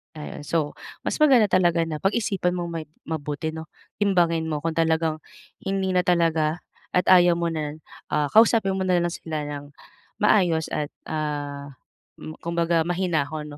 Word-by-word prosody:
Ayun 150 -1 -8
so 155 -3 -1 0.2
mas - - -2
maganda 260 -9 +5
talaga 175 -3 +3
na 165 -2 -2
pag-isipan 195 -1 0
mong 175 -1 -3
mai 165 -2 -5 0.2
mabuti, 150 0 -4
'no 160 0 -7 0.3
timbangin 175 -5 +2
mo 155 -2 -2
kung 165 +1 -3
talagang 160 -1 +1 0.4
hindi 195 -1 -2
na 180 -1 +1
talaga 165 -2 +1 0.3
at 180 0 +2
ayaw 175 -1 +7
mo 170 0 -1
na, 155 -2 -3 0.4
ah, 150 -1 +1
kausapin 220 -2 +4
mo 190 - -1
nalang 175 -2 +2
sila 160 -2 -5
ng 145 -1 -7 0.5
maayos, 180 -7 +3
at 150 -1 -3 0.2
ah, 145 -2 -4 0.5
hmm, 155 - -8
kumbaga 170 -1 +1
mahinahon 155 -4 -2
165 Hz, 150 wpm, -24 LUFS, 155-180 Hz, 0.5 s, ayaw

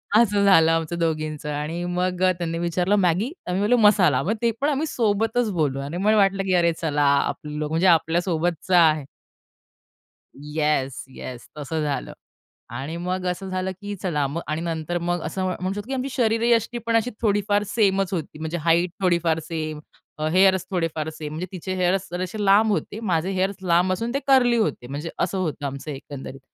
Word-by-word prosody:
असं 205 -3 +4
झालं 165 -5 +6
आमचं 165 +1 -1
दोघींचं. 155 -2 -2
आणि 155 +4 -3
मग 180 +1 -1
अ, 185 - +5
त्यांनी 165 -1 -2
विचारलं 175 +3 +1
मॅगी 195 - +1 0.2
आम्ही 180 +2 0
बोललो 225 +5 +3
मसाला. 180 -11 +4
मग 200 - 0
ते 235 -1 +3
पण 290 - +2
आम्ही 295 +1 0
सोबतच 225 0 +1
बोललो 150 -7 0
आणि 145 +5 -5
मला 210 +3 +3
वाटलं, 195 -1 +3
की 190 -1 0
अरे 170 -1 +3
चला, 150 -3 +1
आपलं 150 +1 0
म्हणजे 165 +5 +1
आपल्यासोबतचा 170 +1 +2
आहे. 155 -2 0 1.3
Yes, 150 -2 -1
yes. 125 -2 -8
तसं 155 +2 -3
झालं. 145 -2 -3 0.6
आणि 135 +7 -5
मग 180 +1 -3
असं 185 +2 -3
झालं, 185 0 -2
की 205 0 -5
चला 165 -6 -1 0.2
आणि 155 +1 -2
नंतर 165 0 -2
मग 175 0 -1
असं 190 - -3
म्हणू 185 +1 -2
शकतो 205 +2 -6
की 270 - -4
आमची 265 +1 -2
शरीरयष्टी 230 -1 +1
पण 230 0 +1
अशी 230 +2 +2
थोडीफार 205 -1 +1
सेमच 195 -3 +1
होती 160 -3 -4
म्हणजे 160 +2 -3
हाईट 170 +2 +3
थोडीफार 170 -3 +2
सेम 155 -1 -4 0.4
अ, 155 - 0
हेअर्स 190 0 +4
थोडेफार 165 -4 -1
सेम 150 -1 -7
म्हणजे 165 +4 -4
तिचे 185 +1 -5
हेअर्स 185 +1 +1
जसे 185 +4 -3
लांब 210 +3 +5
होते. 205 +1 -2
माझे 185 -4 0
हेअर्स 190 +1 0
लांब 180 +1 +3
असून 230 +6 -3
ते 275 - +1
कर्ली 250 -3 +5
होते 215 - -1
म्हणजे 145 +5 -5
असं 195 - 0
होतं 160 -5 -2
आमचं 140 +2 -5
एकंदरीत. 135 -1 -8
180 Hz, 180 wpm, -23 LUFS, 155-200 Hz, 1.3 s, झालं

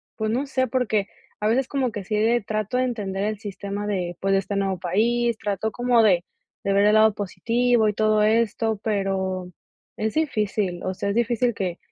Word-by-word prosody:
pues, 220 -1 -1
no 265 +5 0
sé, 260 -1 0
porque 220 -5 0 0.3
a 210 - +1
veces 255 +3 +2
como 265 -4 -1
que 205 -3 -6
sí 215 - -2
de 225 +3 +3
trato 215 +3 -2
de 255 - +2
entender 200 -5 -3
el 215 -1 -2
sistema 205 0 -5
de, 180 -4 -2
pues, 195 0 +1
de 195 - +4
este 200 +1 -4
nuevo 195 -2 -1
país, 230 +6 +1
trato 210 +1 -2
como 245 -1 +3
de 180 -5 +4 0.4
de 195 - +1
ver 200 +1 +4
el 210 - +5
lado 220 -1 +5
positivo 225 +4 +1
y - - -1
todo 215 0 +2
esto, 220 0 +1
pero 190 -3 -1 0.5
es 215 0 -1
difícil, 210 - -1
o 185 - -1
sea, 200 +2 -3
es 200 - -1
difícil 240 0 +1
que, 180 -3 -3
215 Hz, 200 wpm, -24 LUFS, 195-235 Hz, 0.5 s, el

